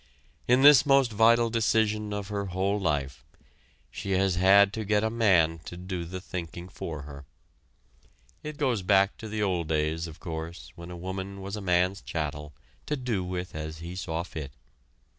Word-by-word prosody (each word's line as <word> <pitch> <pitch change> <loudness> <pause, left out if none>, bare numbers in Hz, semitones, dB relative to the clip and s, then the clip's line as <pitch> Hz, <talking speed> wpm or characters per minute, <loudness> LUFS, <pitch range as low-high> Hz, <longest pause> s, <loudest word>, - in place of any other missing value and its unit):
In 125 +2 +4
this 145 -3 +9
most 135 -4 +4
vital 115 +2 +4
decision 110 -2 +1
of 100 -1 -4
her 100 -1 -2
whole 95 +3 0
life, 75 -7 -2 0.7
she 100 - -4
has 95 0 +2
had 100 +3 +5
to 110 - -3
get 105 0 +1
a 110 - 0
man 90 -8 +3
to 85 - -8
do 90 -1 -5
the 95 +2 -6
thinking 85 -1 -7
for 80 -6 -6
her. 70 -1 -10 1.2
It 150 -1 -7
goes 130 -8 0
back 95 +1 +3
to 110 - -8
the 105 0 -2
old 90 -5 0
days, 80 +1 -1
of 80 +1 -11
course, 80 -1 -7
when 85 -1 -10
a 90 - -7
woman 95 +2 -5
was 95 +1 -5
a 105 - -6
man's 90 +1 +1
chattel, 75 -2 -4 0.4
to 150 - 0
do 120 -7 -2
with 90 0 -5
as 80 0 -5
he 85 +2 -7
saw 85 -2 -3
fit. 75 -6 -7
95 Hz, 180 wpm, -27 LUFS, 85-105 Hz, 1.2 s, this